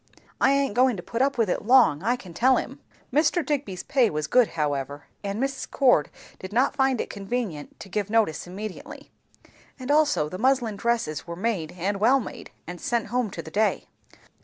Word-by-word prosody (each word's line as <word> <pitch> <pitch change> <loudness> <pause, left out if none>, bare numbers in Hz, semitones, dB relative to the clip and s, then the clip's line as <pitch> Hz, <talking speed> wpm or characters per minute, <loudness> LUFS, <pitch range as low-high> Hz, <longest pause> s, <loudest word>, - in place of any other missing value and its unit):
I 270 - +5
aint 275 -5 +1
goin' 250 -1 +3
to 175 - -7
put 230 +6 -3
up 275 0 +1
with 230 -2 +2
it 180 - -1
long, 235 - +5
I 235 +5 +1
can 190 -8 -12
tell 260 +8 +4
'em." - - -5 0.3
Mr. 315 +2 +2
Digby's 255 -11 -3
pay 255 -5 +2
was 155 -1 -2
good 245 - +4
however, 145 -1 -2 0.2
and 200 +1 -3
Mrs. 270 +1 -3
Cord 245 - +3 0.3
did 185 - -8
not 250 +6 +2
find 265 -3 +2
it - - -2
convenient 200 -6 -5
to - - -9
give 205 +1 -3
notice 210 -8 +1
immediately; 195 +2 -8 0.7
and 260 +1 -4
also 295 - +3
the 185 +4 -7
muslin 250 -3 +2
dresses 225 -9 -1
were 170 - -5
made 185 -5 -2
and 195 +3 -2
well 250 +6 +4
made, 245 - -8 0.2
and 175 +1 -8
sent 235 -3 -1
home 250 -3 +1
to 170 -3 -7
the 160 - -10
day. 215 +4 0
220 Hz, 195 wpm, -25 LUFS, 180-255 Hz, 0.7 s, I